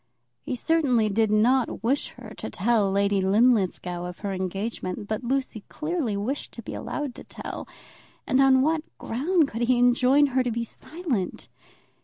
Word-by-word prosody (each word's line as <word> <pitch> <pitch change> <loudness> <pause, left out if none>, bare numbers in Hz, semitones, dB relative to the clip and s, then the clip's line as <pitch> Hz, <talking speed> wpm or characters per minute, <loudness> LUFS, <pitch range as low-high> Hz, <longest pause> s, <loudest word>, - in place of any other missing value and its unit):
He 255 - -3
certainly 250 -6 +2
did 220 +1 +2
not 230 +3 +2
wish 265 +5 +1
her - - -10
to - - -5
tell 215 0 +2
Lady 200 0 +2
Linlithgow 190 -4 +2
of 180 0 -8
her 200 -2 -2
engagement, 190 +1 -4
but 215 +3 -3
Lucy 255 -4 -2
clearly 305 - -2
wished 250 +9 -3
to - - -9
be - - -7
allowed 290 -4 -4
to - - -10
tell, - - -7 0.6
and 260 - +3
on 265 -1 +5
what 315 +1 +2 0.2
ground 305 +7 +1
could 230 -3 -5
he 245 +1 +3
enjoin 250 +3 +4
her 260 - +3
to 250 - -1
be 235 0 -2
silent? 260 - -4
235 Hz, 165 wpm, -26 LUFS, 205-270 Hz, 0.6 s, on